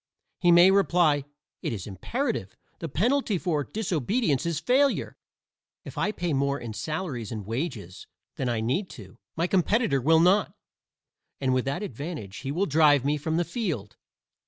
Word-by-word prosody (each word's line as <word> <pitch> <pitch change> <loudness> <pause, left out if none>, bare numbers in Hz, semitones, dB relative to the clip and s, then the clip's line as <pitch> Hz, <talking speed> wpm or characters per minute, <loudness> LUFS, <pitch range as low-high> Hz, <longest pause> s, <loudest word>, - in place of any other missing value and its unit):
He 175 -1 +4
may 175 +2 +7
reply: 170 -6 +3 0.4
"It - - -2
is 100 -6 -5
imperative; 110 - -3 0.2
the 165 - -5
penalty 230 - +1
for 160 -4 -1
disobedience 175 - -1
is 165 -3 -1
failure. 270 +7 +1 0.7
If - - -9
I 210 - 0
pay 175 -5 -2
more 140 +1 0
in 115 -2 -6
salaries 150 - -4
and 110 -4 -5
wages 110 - -5 0.3
than 130 - -2
I 115 -2 -1
need 135 - -1
to, 95 -5 -13 0.2
my 165 - 0
competitor 185 - +2
will 160 +5 +4
not; 190 +4 +3 0.8
and 130 -2 +1
with 130 0 +1
that 140 +9 -2
advantage 140 - -6
he 135 - -4
will 180 +7 0
drive 145 -4 +4
me 145 +1 +2
from 160 +2 -2
the 175 - +1
field." 160 - -4
155 Hz, 160 wpm, -26 LUFS, 130-185 Hz, 0.8 s, may